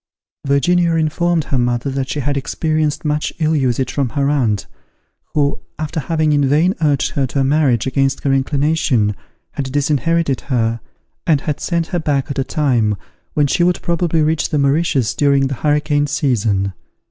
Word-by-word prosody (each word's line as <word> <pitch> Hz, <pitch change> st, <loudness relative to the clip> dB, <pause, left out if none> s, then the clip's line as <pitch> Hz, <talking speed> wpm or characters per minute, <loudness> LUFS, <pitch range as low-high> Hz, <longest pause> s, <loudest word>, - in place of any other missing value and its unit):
Virginia 170 Hz, +5 st, +2 dB
informed 165 Hz, +1 st, +1 dB
her 135 Hz, -, -1 dB
mother 120 Hz, +2 st, 0 dB
that 135 Hz, 0 st, -3 dB
she 145 Hz, -, -2 dB
had 145 Hz, +2 st, -1 dB
experienced 155 Hz, +2 st, -1 dB
much 150 Hz, 0 st, 0 dB
ill 160 Hz, -1 st, +1 dB
usage 130 Hz, -2 st, 0 dB
from 140 Hz, -4 st, 0 dB
her 140 Hz, +4 st, 0 dB
aunt, 115 Hz, -8 st, 0 dB, 0.7 s
who, 145 Hz, -1 st, +1 dB, 0.2 s
after 155 Hz, +2 st, -3 dB
having 155 Hz, 0 st, 0 dB
in 145 Hz, -1 st, +3 dB
vain 160 Hz, +6 st, +3 dB
urged 145 Hz, -4 st, +1 dB
her 135 Hz, -2 st, 0 dB
to 140 Hz, -, -2 dB
a -, -, +3 dB
marriage 135 Hz, -4 st, +2 dB
against 135 Hz, +1 st, 0 dB
her 140 Hz, -, +2 dB
inclination, 135 Hz, -6 st, +1 dB, 0.4 s
had 135 Hz, -2 st, -4 dB
disinherited 145 Hz, +1 st, +1 dB
her, 115 Hz, -3 st, -1 dB, 0.5 s
and 150 Hz, -5 st, +3 dB
had 150 Hz, -2 st, -3 dB
sent 170 Hz, -2 st, -1 dB
her 175 Hz, -, -2 dB
back 145 Hz, -4 st, -1 dB
at 140 Hz, -, -3 dB
a -, -, +2 dB
time 125 Hz, -7 st, +1 dB, 0.4 s
when 150 Hz, -, +3 dB
she 160 Hz, +5 st, +1 dB
would 180 Hz, 0 st, +2 dB
probably 170 Hz, -2 st, +1 dB
reach 155 Hz, +1 st, 0 dB
the 150 Hz, -, 0 dB
Mauritius 140 Hz, -3 st, +1 dB
during 140 Hz, -1 st, +2 dB
the 135 Hz, -, -2 dB
hurricane 150 Hz, -1 st, +1 dB
season. 110 Hz, -9 st, 0 dB
145 Hz, 170 wpm, -18 LUFS, 135-155 Hz, 0.7 s, in